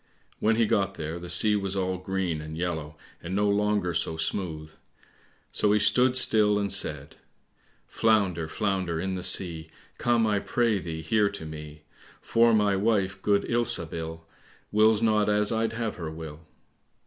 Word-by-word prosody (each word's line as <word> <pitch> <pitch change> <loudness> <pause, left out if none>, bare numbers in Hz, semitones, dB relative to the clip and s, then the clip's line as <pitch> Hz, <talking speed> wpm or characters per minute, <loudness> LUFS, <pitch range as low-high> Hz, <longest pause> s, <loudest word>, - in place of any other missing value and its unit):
When 110 +1 +2
he 115 0 +3
got 100 -2 0
there 80 +2 -5
the 90 0 -8
sea 105 +5 +5
was 100 -1 -2
all 95 -1 -1
green 90 -4 -2
and 80 +1 -8
yellow, 80 -3 -4 0.2
and 90 +3 -5
no 105 +1 +2
longer 100 -3 +1
so 80 -1 -1
smooth; 80 -2 -3 0.8
so 105 -1 +2
he - - +4
stood 125 +4 +4
still 105 -4 +3
and 100 -1 -1
said, 75 -7 -2 0.7
"Flounder, 100 -7 +1
flounder 95 -2 -2
in 95 +2 -2
the 90 - -4
sea, 85 -3 -1 0.3
Come, 120 -1 +2
I 105 -2 +1
pray 115 -1 0
thee, 80 -2 -6
here 105 -1 +2
to 100 -5 -8
me; 75 -1 -9 0.4
For 115 0 +3
my 105 -3 +3
wife, 100 -2 0
good 100 0 +2
Ilsabil, 80 -8 -2 0.5
Wills 110 +1 +3
not 105 -2 +2
as 105 0 +2
I'd 115 0 0
have 115 -2 -3
her 85 -3 -5
will." 80 0 -9
95 Hz, 160 wpm, -26 LUFS, 80-105 Hz, 0.8 s, sea